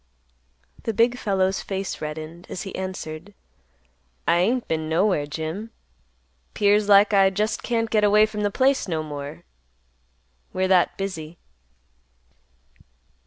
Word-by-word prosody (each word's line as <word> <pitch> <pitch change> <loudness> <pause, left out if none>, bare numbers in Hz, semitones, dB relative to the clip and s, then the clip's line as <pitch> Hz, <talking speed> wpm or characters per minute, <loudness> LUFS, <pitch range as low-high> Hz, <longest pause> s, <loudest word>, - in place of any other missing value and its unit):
The 225 - -3
big 235 +2 +3
fellow's 190 -2 0
face 195 -1 -4
reddened, 155 +3 -7
as 185 - -5
he 195 - -7
answered, 185 0 -6 0.9
"I 170 - +4
ain't 235 +7 +1
been 160 -1 -2
nowhere, 165 -3 +1
Jim. 160 +9 -5 0.9
'Pears 205 0 +3
like 205 +1 +6
I 195 -1 +6
just 210 +3 -1
can't 230 -2 0
get 215 -1 +3
away 210 +1 +6
from 215 -1 -5
the 205 - +1
place 260 +5 +2
no 160 -3 -2
more; 145 +2 -7 1.1
we're 185 0 0
that 185 -2 +3
busy." 170 -4 -5
190 Hz, 125 wpm, -24 LUFS, 160-210 Hz, 1.1 s, like